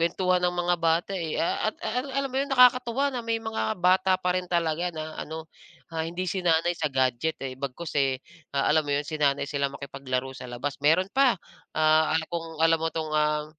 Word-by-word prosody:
Kwentuhan 180 Hz, +2 st, +2 dB
ng 180 Hz, 0 st, +2 dB
mga 175 Hz, 0 st, +1 dB
bata, 165 Hz, +3 st, +1 dB
eh, 165 Hz, -4 st, -3 dB
a 170 Hz, -, 0 dB
ah, -, -, -22 dB
at -, -, -28 dB
ala 250 Hz, +5 st, -2 dB
alam 275 Hz, -1 st, 0 dB
mo -, -, -3 dB
yun, 280 Hz, -, -2 dB
nakakatuwa 250 Hz, +1 st, +5 dB
na 245 Hz, -, -2 dB
may 230 Hz, 0 st, 0 dB
mga 220 Hz, -, -2 dB
bata 185 Hz, +1 st, +4 dB
pa 180 Hz, -1 st, 0 dB
rin 180 Hz, -1 st, -2 dB
talaga 170 Hz, 0 st, 0 dB
na 155 Hz, 0 st, -6 dB
ano, 160 Hz, +1 st, -6 dB, 0.5 s
ah, 160 Hz, -, -2 dB
hindi 175 Hz, +3 st, -3 dB
sinanay 175 Hz, -2 st, +2 dB
sa 155 Hz, -2 st, -1 dB
gadget, 130 Hz, +4 st, +1 dB
eh. 130 Hz, -, -4 dB
Bagkus, 140 Hz, +4 st, -5 dB
eh, 135 Hz, -1 st, +2 dB, 0.4 s
ah, 140 Hz, -, +2 dB
alam 155 Hz, -1 st, +3 dB
mo -, -, +1 dB
yun, 145 Hz, -, -1 dB
sinanay 145 Hz, -3 st, +1 dB
sila 140 Hz, 0 st, -1 dB
makipaglaro 135 Hz, -2 st, -4 dB
sa 125 Hz, -1 st, -8 dB
labas. 135 Hz, +4 st, -4 dB
Meron 165 Hz, +6 st, +3 dB
pa, 265 Hz, -5 st, +4 dB, 0.4 s
ah, 155 Hz, 0 st, +4 dB
ah, 160 Hz, -, -1 dB
kung 165 Hz, -2 st, -5 dB
alam 165 Hz, -1 st, +4 dB
mo 165 Hz, -, 0 dB
'tong, 155 Hz, -1 st, -3 dB
ah 150 Hz, 0 st, +2 dB
165 Hz, 210 wpm, -26 LUFS, 150-185 Hz, 0.5 s, nakakatuwa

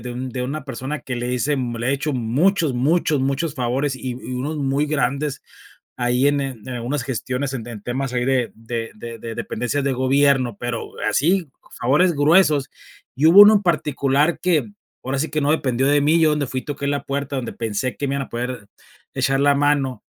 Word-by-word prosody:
de 125 Hz, 0 st, -6 dB
un 130 Hz, +2 st, -5 dB
de 125 Hz, +1 st, -4 dB
una 140 Hz, +3 st, -4 dB
persona 135 Hz, +2 st, -5 dB
que 125 Hz, -1 st, -5 dB
le 120 Hz, +1 st, -3 dB
hice 140 Hz, +4 st, 0 dB
le 120 Hz, -2 st, -2 dB
he 135 Hz, -, +3 dB
hecho 145 Hz, +2 st, -2 dB
muchos, 140 Hz, -, +1 dB
muchos, 150 Hz, +3 st, +1 dB
muchos 140 Hz, +3 st, -1 dB
favores, 130 Hz, +1 st, -1 dB
y 130 Hz, 0 st, -5 dB
y -, -, -4 dB, 0.2 s
unos 140 Hz, +5 st, -3 dB
muy 140 Hz, +1 st, 0 dB
grandes 140 Hz, -1 st, -1 dB, 0.6 s
ahí 125 Hz, +2 st, +2 dB
en 145 Hz, 0 st, +1 dB
en 130 Hz, -5 st, -6 dB
algunas 125 Hz, +2 st, -3 dB
gestiones, 130 Hz, +1 st, -3 dB
en 120 Hz, -4 st, -5 dB
en 115 Hz, -4 st, -8 dB
temas 130 Hz, +2 st, -3 dB
ahí 125 Hz, 0 st, 0 dB
de 130 Hz, -3 st, +1 dB
de 115 Hz, 0 st, -5 dB
de 115 Hz, +1 st, -8 dB
de 115 Hz, 0 st, -6 dB
dependencias 125 Hz, +7 st, -2 dB
de 140 Hz, -, +1 dB
gobierno, 130 Hz, -2 st, +2 dB
pero 120 Hz, -1 st, -4 dB, 0.2 s
así, 170 Hz, +1 st, +1 dB, 0.3 s
favores 150 Hz, +9 st, +3 dB
gruesos. 150 Hz, -2 st, +3 dB, 0.4 s
Y 145 Hz, +4 st, +2 dB
hubo 175 Hz, +5 st, +9 dB
uno 205 Hz, +1 st, +10 dB
en 205 Hz, -, +3 dB
particular 150 Hz, -2 st, +1 dB
que, 180 Hz, +2 st, +1 dB, 0.3 s
ahora 135 Hz, +2 st, -2 dB
sí 160 Hz, +4 st, -1 dB
que 155 Hz, -, -1 dB
no 145 Hz, 0 st, +1 dB
dependió 130 Hz, -4 st, 0 dB
de 145 Hz, +1 st, +4 dB
mí, 155 Hz, +3 st, +4 dB
yo, 160 Hz, -, +5 dB
donde 150 Hz, -2 st, 0 dB
fui, 130 Hz, +1 st, -4 dB
toqué 145 Hz, -1 st, -5 dB
la 145 Hz, 0 st, -1 dB
puerta, 140 Hz, 0 st, -3 dB
donde 120 Hz, -3 st, -4 dB
pensé 115 Hz, +1 st, -3 dB
que 145 Hz, -, -3 dB
me 140 Hz, -, -1 dB
iban 135 Hz, -1 st, -3 dB
a -, -, -24 dB
poder 120 Hz, -2 st, -5 dB, 0.5 s
echar 135 Hz, 0 st, +1 dB
la 145 Hz, 0 st, +4 dB
mano. 140 Hz, -4 st, +1 dB
135 Hz, 205 wpm, -21 LUFS, 125-145 Hz, 0.6 s, uno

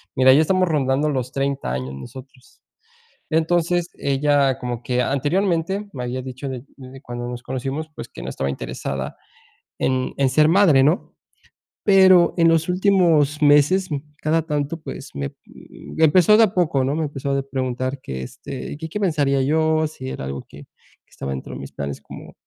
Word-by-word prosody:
mira, 130 Hz, 0 st, +6 dB
ya 140 Hz, -, +5 dB
estamos 185 Hz, +3 st, +2 dB
rondando 145 Hz, -1 st, +1 dB
los 130 Hz, -3 st, -2 dB
30 135 Hz, -, -2 dB
años 65 Hz, +1 st, -4 dB
nosotros. 130 Hz, -, -12 dB, 0.7 s
Entonces, 170 Hz, +2 st, +1 dB
ella 140 Hz, -1 st, +2 dB
como 120 Hz, -1 st, -4 dB
que 125 Hz, 0 st, 0 dB
anteriormente 175 Hz, +8 st, 0 dB
me 125 Hz, -, -6 dB
había 125 Hz, +1 st, -3 dB
dicho 130 Hz, +2 st, -6 dB
de 130 Hz, -2 st, -6 dB
desde 130 Hz, +1 st, -11 dB
cuando 120 Hz, -2 st, -6 dB
nos 120 Hz, 0 st, -6 dB
conocimos, 135 Hz, +5 st, -4 dB
pues, -, -, -8 dB
que -, -, -11 dB
no -, -, -5 dB
estaba 70 Hz, 0 st, -3 dB
interesada 70 Hz, 0 st, -5 dB, 0.6 s
en 130 Hz, -1 st, 0 dB
en 135 Hz, -1 st, +3 dB
ser 150 Hz, +4 st, +4 dB
madre, 165 Hz, -7 st, +5 dB
¿no? 155 Hz, +5 st, 0 dB, 0.7 s
Pero 190 Hz, -3 st, +6 dB
en 165 Hz, 0 st, +5 dB
los 165 Hz, 0 st, +2 dB
últimos 170 Hz, -6 st, +3 dB
meses, 150 Hz, +6 st, +4 dB
m 145 Hz, -2 st, -2 dB, 0.2 s
cada 160 Hz, +2 st, +2 dB
tanto, 150 Hz, +2 st, -2 dB
pues, -, -, -8 dB
me 70 Hz, -1 st, -4 dB
me 160 Hz, -, -4 dB
empezó 185 Hz, +6 st, +5 dB
de 225 Hz, -, +7 dB
a 210 Hz, -1 st, -1 dB
poco, 155 Hz, -7 st, +1 dB
¿no? 140 Hz, -, 0 dB
Me 160 Hz, -, 0 dB
empezó 140 Hz, -1 st, -3 dB
de 140 Hz, -, 0 dB
preguntar 130 Hz, 0 st, -3 dB
que, 65 Hz, -1 st, -5 dB
este, 65 Hz, -, -7 dB
que 160 Hz, +1 st, -6 dB
qué 210 Hz, -, -4 dB
pensaría 145 Hz, -8 st, +1 dB
yo, 155 Hz, +2 st, +2 dB
si 130 Hz, -4 st, -8 dB
era -, -, -6 dB
algo 70 Hz, 0 st, -5 dB
que -, -, -13 dB, 0.5 s
que -, -, -37 dB
estaba 70 Hz, -, -5 dB
dentro 65 Hz, -, -6 dB
de -, -, -7 dB
mis 70 Hz, -, -8 dB
planes 70 Hz, -1 st, -5 dB
como -, -, -11 dB
140 Hz, 180 wpm, -21 LUFS, 130-165 Hz, 0.7 s, de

